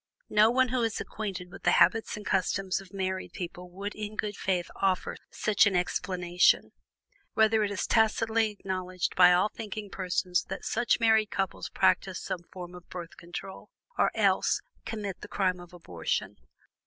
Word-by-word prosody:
No 215 +1 +6
one 255 +1 +3
who 255 0 0
is 225 -2 0
acquainted 190 -4 -5
with 195 - -11
the - - +3
habits 225 -1 +3
and 210 - -9
customs 195 0 0
of 190 -2 -15
married 190 -1 -3
people 180 -1 -7
would 200 +3 -5
in 210 0 -6
good 210 -1 -2
faith 180 -3 -1
offer 190 -2 0
such 215 0 +3
an 195 - +1
explanation. 180 0 +2 0.6
Rather 220 0 +4
is 205 -1 -2
it - - -7
tacitly 225 0 +3
acknowledged 185 -3 -3
by 180 -1 +8
all 180 +4 +4
thinking 210 -2 -7
persons 180 -1 0
that - - -6
such 240 +2 +1
married 220 -2 +4
couples 195 -1 -3
practice - - +2
some 180 - -4
form 180 -1 -8
of 180 -1 -13
Birth 175 -2 -7
Control, 175 +2 -8 0.3
or - - +3
else - - +3 0.3
commit 205 -4 -5
the - - -8
crime 185 -2 0
of 175 0 -12
abortion. 90 - -3
195 Hz, 165 wpm, -29 LUFS, 180-215 Hz, 0.6 s, by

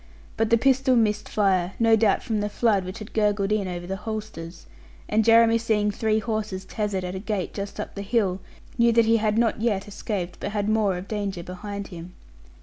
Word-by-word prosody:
But 225 -1 0
the 230 - +5
pistol 265 +1 +3
missed 210 -2 +1
fire, 190 -3 +1
no 225 -1 +5
doubt 220 -2 +2
from 220 -2 -1
the 205 0 -1
flood 205 -4 +1
which 185 +3 -6
had 215 -1 -10
gurgled 205 -2 +1
in 210 -3 +1
over 175 -1 -5
the 190 +2 -4
holsters; 210 -6 -7 0.4
and 220 +1 +2
Jeremy 230 0 +5
seeing 210 -2 +1
three 215 +1 0
horses 215 -3 -3
tethered 205 -3 -2
at 180 0 -4
a 190 - -4
gate 205 -3 -3
just 200 +1 -6
up 210 - -5
the 200 - -6
hill, 200 -3 0 0.4
knew 235 0 +5
that 230 0 +5
he 225 +1 +4
had 215 -1 0
not 225 -2 +1
yet 210 -4 0
escaped, 195 -3 -4
but 205 - -4
had 205 -1 -1
more 215 -4 +2
of 180 +2 -7
danger 200 -4 -3
behind 200 +3 -6
him. 175 0 -10
210 Hz, 210 wpm, -25 LUFS, 195-225 Hz, 0.4 s, the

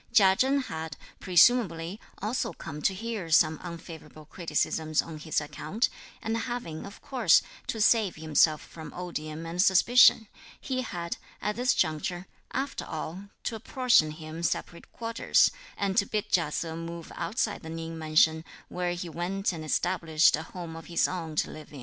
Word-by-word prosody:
Chia 190 -3 +6
Chen 270 +5 +2
had, 160 - -6 0.2
presumably, 185 -2 +3 0.2
also 215 -4 -1
come 150 -1 -8
to 195 - +3
hear 215 -4 -4
some 160 -1 +4
unfavourable 165 -3 -9
criticisms 155 -1 -1
(on 160 -2 -1
his 155 0 0
account), 155 +9 -2 0.3
and 225 0 -1
having, 230 -9 -4
of 200 - -12
course, 240 -11 +4 0.2
to 225 - -3
save 215 -3 +4
himself 155 0 +3
from 160 -2 -10
odium 165 -3 -5
and 170 +2 0
suspicion, 220 +4 +6 0.3
he 255 -1 -2
had, 170 -8 -4 0.2
at 210 0 -2
this 250 +2 +2
juncture, 175 +2 -1 0.3
after 270 +1 -2
all, 165 +5 -6 0.2
to 230 - -2
apportion 240 - +3
him 155 +1 -8
separate 170 +1 -3
quarters, 230 0 +2 0.3
and 195 -1 -1
to 200 - +4
bid 215 0 -2
Chia 165 -4 +2
Se 160 +1 -3
move 165 0 -7
outside 215 -1 -2
the 160 - -9
Ning 165 0 -5
mansion, 160 0 +3 0.3
where 180 -1 -2
he 175 0 -5
went 180 +4 -2
and 160 -2 -6
established 160 0 +3
a 155 - -5
home 165 0 -8
of 165 -1 -10
his 170 - +2
own 165 -4 -5
to - - 0
live 155 - -11
in. 145 - -9
170 Hz, 165 wpm, -28 LUFS, 160-205 Hz, 0.3 s, Chia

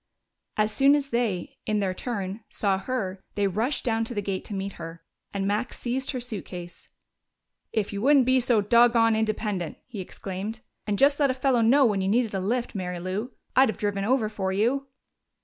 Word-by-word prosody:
As 215 0 +2
soon 275 +5 +5
as 285 -1 -2
they, 225 -7 -1
in 215 -1 +1
their 190 -2 0
turn, 200 -1 -4
saw 195 -2 0
her, 195 -4 -3
they 205 - +1
rushed 220 +9 0
down 225 -2 +1
to 240 - -6
the 205 - 0
gate 195 -1 -2
to 205 - -5
meet 195 0 -3
her, 165 0 -8 0.3
and 195 -1 -2
Max 210 +5 -1
seized 260 +2 -2
her 255 - -2
suitcase. 185 -7 -7 0.8
"If 210 -2 -1
you 200 - -3
wouldn't 275 +1 +5
be 260 +1 +4
so 240 -3 +3
doggone 230 +1 +5
independent," 215 -6 -1
he 215 - -8
exclaimed, 195 +4 -6 0.3
"and 205 -1 0
just 280 +4 +4
let 285 -2 +4
a 255 - 0
fellow 260 -2 +2
know 265 +5 +5
when 205 -4 +2
you 190 - 0
needed 225 +1 +2
a 195 - 0
lift, 235 +6 -1
Mary 180 -3 -3
Lou, 195 +8 -3 0.2
I'd 265 -2 +6
have - - -3
driven 205 -1 -1
over 235 +1 +2
for 195 -3 -2
you!" 245 +8 +1
215 Hz, 200 wpm, -26 LUFS, 195-245 Hz, 0.8 s, I'd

